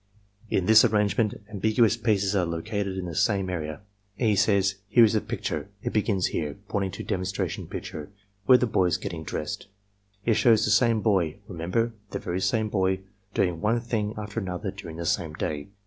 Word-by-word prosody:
In 95 Hz, -, +1 dB
this 110 Hz, +2 st, +7 dB
arrangement 105 Hz, -1 st, +2 dB
ambiguous 110 Hz, +1 st, +3 dB
pieces 105 Hz, -4 st, +1 dB
are 95 Hz, -, +3 dB
located 95 Hz, +4 st, -3 dB
in 95 Hz, -, -3 dB
the 85 Hz, -, -5 dB
same 95 Hz, +2 st, +1 dB
area. 80 Hz, -2 st, -4 dB, 0.4 s
E. 110 Hz, -3 st, +2 dB
says: 100 Hz, -1 st, +2 dB
''Here 120 Hz, -, +7 dB
is 110 Hz, -, +5 dB
a 110 Hz, -, +2 dB
picture -, -, -4 dB
— 100 Hz, -, -33 dB
it -, -, -2 dB
begins 100 Hz, -3 st, +1 dB
here 75 Hz, -3 st, -2 dB
(pointing 100 Hz, -2 st, 0 dB
to -, -, -6 dB
demonstration 95 Hz, +1 st, -3 dB
picture) 75 Hz, -2 st, -6 dB, 0.4 s
where 130 Hz, -, +9 dB
the 125 Hz, -, +1 dB
boy 95 Hz, -5 st, +2 dB
is 90 Hz, -1 st, +2 dB
getting 85 Hz, -3 st, -5 dB
dressed. 80 Hz, -, -4 dB, 0.6 s
It 115 Hz, -, +4 dB
shows 115 Hz, -1 st, +4 dB
the 105 Hz, -, +1 dB
same 115 Hz, 0 st, +4 dB
boy— 95 Hz, -8 st, +2 dB
remember, 95 Hz, +7 st, -1 dB, 0.2 s
the -, -, -3 dB
very 90 Hz, +2 st, -3 dB
same 110 Hz, 0 st, +1 dB
boy 95 Hz, -2 st, 0 dB, 0.2 s
— 95 Hz, 0 st, -40 dB
doing 90 Hz, -4 st, +1 dB
one 110 Hz, +3 st, +2 dB
thing 110 Hz, -3 st, -2 dB
after 105 Hz, +1 st, -4 dB
another 95 Hz, 0 st, -4 dB
during 85 Hz, -5 st, -9 dB
the 85 Hz, -, -4 dB
same 80 Hz, -1 st, -1 dB
day. 75 Hz, -2 st, -3 dB
100 Hz, 195 wpm, -26 LUFS, 90-110 Hz, 0.6 s, where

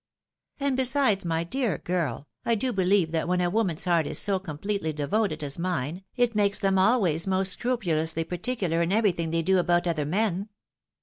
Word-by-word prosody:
And 280 Hz, -1 st, 0 dB
besides, 260 Hz, -6 st, +2 dB
my 165 Hz, 0 st, 0 dB
dear 230 Hz, -, -1 dB
girl, 160 Hz, -6 st, -3 dB, 0.2 s
I 230 Hz, -, +1 dB
do 250 Hz, +3 st, -1 dB
beheve 190 Hz, -3 st, +2 dB
that 165 Hz, 0 st, -1 dB
when 180 Hz, 0 st, +1 dB
a 175 Hz, -1 st, +1 dB
woman's 190 Hz, -7 st, -1 dB
heart 170 Hz, -4 st, +2 dB
is -, -, -3 dB
so 195 Hz, -2 st, +2 dB
com 160 Hz, -6 st, -7 dB
pletely 195 Hz, -4 st, -2 dB
devoted 155 Hz, +2 st, -1 dB
as 140 Hz, +2 st, -5 dB
mine, 175 Hz, 0 st, -2 dB
it 245 Hz, -2 st, +2 dB
makes 205 Hz, -1 st, +2 dB
them 195 Hz, -1 st, +1 dB
always 190 Hz, -6 st, +2 dB
most 190 Hz, 0 st, +1 dB
scrupu 245 Hz, -1 st, -1 dB
lously 160 Hz, +1 st, -1 dB
particidar 180 Hz, -2 st, -1 dB
in 170 Hz, +1 st, 0 dB
everything 195 Hz, -6 st, +1 dB
they 165 Hz, 0 st, 0 dB
do 190 Hz, +2 st, +3 dB
about 175 Hz, 0 st, +2 dB
other 155 Hz, -4 st, -1 dB
men. 200 Hz, +2 st, 0 dB
185 Hz, 190 wpm, -26 LUFS, 165-210 Hz, 0.2 s, do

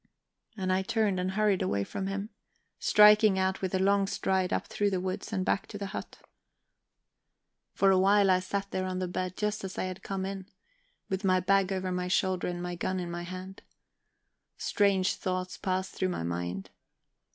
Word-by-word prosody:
And 185 Hz, -1 st, 0 dB
I 190 Hz, -, +2 dB
turned 200 Hz, -1 st, 0 dB
and 185 Hz, +1 st, -1 dB
hurried 210 Hz, -2 st, +2 dB
away 100 Hz, 0 st, 0 dB
from 190 Hz, -, -4 dB
him, 200 Hz, +3 st, -4 dB, 0.5 s
striking 210 Hz, -1 st, +6 dB
out 190 Hz, 0 st, 0 dB
with 190 Hz, 0 st, -1 dB
a -, -, +3 dB
long 195 Hz, +1 st, +3 dB
stride 190 Hz, -1 st, 0 dB
up -, -, 0 dB
through 205 Hz, 0 st, 0 dB
the 190 Hz, -2 st, -1 dB
woods 185 Hz, +4 st, -4 dB
and 190 Hz, -3 st, -1 dB
back -, -, 0 dB
to 205 Hz, -, -7 dB
the 200 Hz, -, -4 dB
hut. -, -, -6 dB, 1.6 s
For 195 Hz, 0 st, +4 dB
a 190 Hz, -, +4 dB
while 195 Hz, 0 st, +5 dB
I 185 Hz, -, +4 dB
sat 200 Hz, +2 st, -3 dB
there 185 Hz, 0 st, -1 dB
on 185 Hz, 0 st, -3 dB
the 185 Hz, 0 st, -1 dB
bed 185 Hz, +1 st, -3 dB
just 210 Hz, 0 st, -1 dB
as 190 Hz, -1 st, -6 dB
I -, -, -1 dB
had 185 Hz, 0 st, -5 dB
come 190 Hz, -1 st, -3 dB
in, 195 Hz, -1 st, -5 dB, 0.6 s
with 190 Hz, +1 st, -3 dB
my 185 Hz, -1 st, +3 dB
bag 195 Hz, +1 st, +2 dB
over 185 Hz, -1 st, -2 dB
my 180 Hz, 0 st, -2 dB
shoulder 185 Hz, 0 st, +1 dB
and 175 Hz, 0 st, -4 dB
my 175 Hz, 0 st, -3 dB
gun 185 Hz, +2 st, -2 dB
in 175 Hz, -1 st, -4 dB
my 175 Hz, 0 st, -4 dB
hand. 185 Hz, +2 st, -8 dB, 1.0 s
Strange 200 Hz, -2 st, +2 dB
thoughts 185 Hz, 0 st, -3 dB
passed 185 Hz, 0 st, -1 dB
through 185 Hz, -, -1 dB
my 175 Hz, -, -3 dB
mind. 85 Hz, +2 st, -4 dB
190 Hz, 195 wpm, -29 LUFS, 185-195 Hz, 1.6 s, striking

